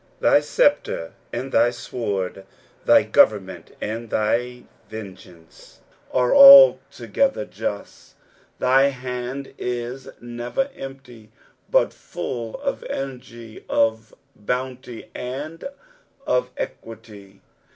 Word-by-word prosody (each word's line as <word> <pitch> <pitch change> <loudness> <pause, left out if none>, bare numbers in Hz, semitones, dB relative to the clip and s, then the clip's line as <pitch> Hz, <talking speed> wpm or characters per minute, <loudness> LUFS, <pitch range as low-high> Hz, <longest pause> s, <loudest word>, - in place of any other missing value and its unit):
Thy - - +4
sceptre 80 - 0 0.2
and 135 +1 -5
thy 120 - +4
sword, 100 -6 -4 0.4
thj - - +4
government 100 -3 +2
and 115 +2 -5
thy 120 +4 -1 0.3
vengeance, 95 -6 -12 0.3
are 125 -1 +2
altogether 280 - +6
just. - - -7 0.4
Thy 130 +2 +4
hand 125 0 -6
is 125 +2 -5
never 120 - -4
empty, 130 -5 -11 0.4
but - - +2
full 120 - -6
of 280 -1 -3
energy, 120 -4 -8
of 110 -1 0 0.2
bounty, 125 +2 -5
and 145 +6 -7 0.6
of 125 0 0
equity. 100 -3 -9
125 Hz, 90 wpm, -22 LUFS, 110-130 Hz, 0.6 s, altogether